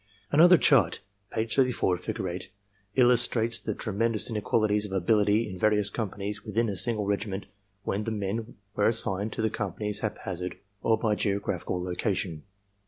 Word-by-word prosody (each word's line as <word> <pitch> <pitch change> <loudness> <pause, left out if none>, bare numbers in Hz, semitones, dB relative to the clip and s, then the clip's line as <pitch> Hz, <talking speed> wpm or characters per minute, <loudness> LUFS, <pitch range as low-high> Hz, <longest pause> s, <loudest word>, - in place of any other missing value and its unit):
"Another 175 +5 +7
chart 115 - +4 0.3
(page 110 0 -1
34, 125 -9 +2
figure 90 +1 -4
8) 90 +1 -5 0.5
illustrates 120 -2 +3
the - - -3
tremen 115 +2 -1
dous 110 - 0
inequalities 105 -1 +1
of - - -12
ability 105 +3 +2
in 95 -3 -7
various 105 0 +3
companies 105 -1 -4
within 115 0 0
a 100 - -2
single 105 +1 0
regiment 100 -1 -2 0.4
when 105 +2 -2
the - - -1
men 110 +1 -3 0.2
were 105 - +3
assigned 105 -2 +1
to 110 - -3
the 110 - +1
companies 105 +1 -3
hap 110 - -3
hazard 90 -1 -4 0.2
or 110 -1 +3
by 110 -1 +1
geographical 100 -3 -1
location. 90 -3 -2
105 Hz, 160 wpm, -28 LUFS, 95-115 Hz, 0.5 s, Another